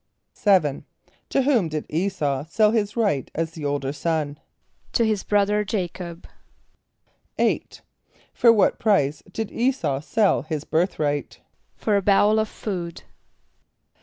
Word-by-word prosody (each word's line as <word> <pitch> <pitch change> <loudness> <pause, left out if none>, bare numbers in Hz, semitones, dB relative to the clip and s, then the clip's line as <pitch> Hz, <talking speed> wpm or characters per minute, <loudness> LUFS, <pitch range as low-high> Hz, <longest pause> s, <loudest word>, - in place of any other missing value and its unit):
= - - -53
=7.= 180 -9 +2 0.5
To 270 - +2
whom 245 - +2
did 155 -1 -4
[=E]´s[a:]u 155 -5 -1
sell 210 +4 +3
his 210 -1 -1
right 200 - +1
as 165 0 -1
the 160 -2 -7
older 140 -1 -1
son? 150 -1 -2 0.5
=To 235 - +3
his 215 -3 0
brother 205 0 +2
J[=a]´cob.= 180 -4 -4 1.1
=8.= - - -1 0.5
For 235 -2 +6
what 215 -3 +3
price 155 -9 +2
did 220 +2 -3
[=E]´s[a:]u 240 - 0
sell 205 +6 +2
his 155 0 -4
birthright? 155 -4 -1 0.3
=For 210 -2 +1
a - - +1
bowl 205 +2 +4
of 215 -1 0
food. 175 -5 -5
185 Hz, 135 wpm, -23 LUFS, 155-210 Hz, 1.1 s, For